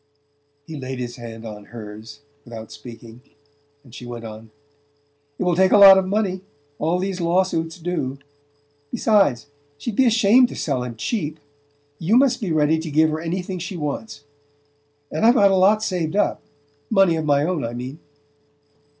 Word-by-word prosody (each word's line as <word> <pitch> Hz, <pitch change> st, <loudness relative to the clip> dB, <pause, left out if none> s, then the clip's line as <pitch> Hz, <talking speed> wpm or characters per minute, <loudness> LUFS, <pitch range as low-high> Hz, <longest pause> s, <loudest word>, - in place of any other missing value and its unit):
He 160 Hz, 0 st, -8 dB
laid 130 Hz, 0 st, -5 dB
his 120 Hz, -1 st, -6 dB
hand 115 Hz, -1 st, -9 dB
on 105 Hz, -2 st, -9 dB
hers 110 Hz, +2 st, -10 dB, 0.2 s
without 115 Hz, -2 st, -10 dB
speaking, 115 Hz, +1 st, -12 dB, 0.6 s
and 125 Hz, -4 st, -18 dB
she -, -, -10 dB
went 120 Hz, -1 st, -8 dB
on: 110 Hz, 0 st, -10 dB, 0.9 s
"It -, -, -2 dB
will 180 Hz, -1 st, +1 dB
take 190 Hz, +1 st, +3 dB
a -, -, +6 dB
lot 195 Hz, -1 st, +9 dB
of 190 Hz, -, -2 dB
money: 190 Hz, -2 st, -1 dB, 0.4 s
all 165 Hz, +3 st, 0 dB
these 190 Hz, 0 st, -3 dB
law 175 Hz, +3 st, +3 dB
suits 165 Hz, -3 st, -4 dB
do. 160 Hz, -6 st, -3 dB, 0.7 s
Besides, 195 Hz, -, +2 dB, 0.3 s
she'd 215 Hz, +8 st, -5 dB
be 260 Hz, +2 st, +4 dB
ashamed 230 Hz, +2 st, +5 dB
to -, -, -8 dB
sell 135 Hz, -5 st, -2 dB
him 125 Hz, -2 st, -6 dB
cheap. 155 Hz, -, -3 dB, 0.6 s
You 180 Hz, +7 st, +1 dB
must 265 Hz, -2 st, +3 dB
be 195 Hz, -6 st, -2 dB
ready 155 Hz, 0 st, +2 dB
to 160 Hz, 0 st, -5 dB
give 155 Hz, +1 st, +3 dB
her 155 Hz, -, -3 dB
anything 180 Hz, +2 st, -4 dB
she 180 Hz, +2 st, -6 dB
wants. 150 Hz, +3 st, -5 dB, 0.9 s
And 155 Hz, -, -2 dB
I've 235 Hz, +3 st, +6 dB
got 200 Hz, -4 st, +5 dB
a -, -, +3 dB
lot 205 Hz, +3 st, +4 dB
saved 175 Hz, -4 st, -2 dB
up 205 Hz, -, 0 dB, 0.5 s
money 195 Hz, -6 st, +4 dB
of 160 Hz, -1 st, -3 dB
my 145 Hz, -1 st, +2 dB
own, 170 Hz, -1 st, -1 dB
I 115 Hz, 0 st, -4 dB
mean..." 130 Hz, +5 st, -7 dB
160 Hz, 175 wpm, -22 LUFS, 125-190 Hz, 0.9 s, lot